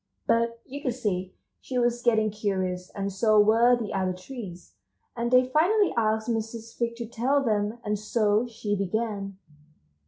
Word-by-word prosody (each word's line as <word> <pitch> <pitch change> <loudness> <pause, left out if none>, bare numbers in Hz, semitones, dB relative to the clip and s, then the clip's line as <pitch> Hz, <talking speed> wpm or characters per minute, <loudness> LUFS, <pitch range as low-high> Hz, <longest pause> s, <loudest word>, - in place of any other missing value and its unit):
But 230 0 +1
you 280 +2 -7
could 255 -5 -1
see 190 -6 -2 0.3
she 255 - -4
was 240 0 +1
getting 220 -3 +2
curious, 185 -3 -2
and 200 -1 -3
so 215 +2 +4
were 225 +4 +5
the 230 -3 -4
other 190 -1 0
trees, 185 -2 -9 0.4
and 235 0 -1
they 255 +1 +5
finally 365 +10 +3
asked 220 -1 +1
Mrs. 225 0 -4
Fig 235 -1 -2
to 235 0 -5
tell 255 +5 +1
them, 215 -1 0
and 210 -1 -1
so 215 +1 +1
she 215 -3 -3
began. 200 0 -2
220 Hz, 160 wpm, -27 LUFS, 205-240 Hz, 0.4 s, were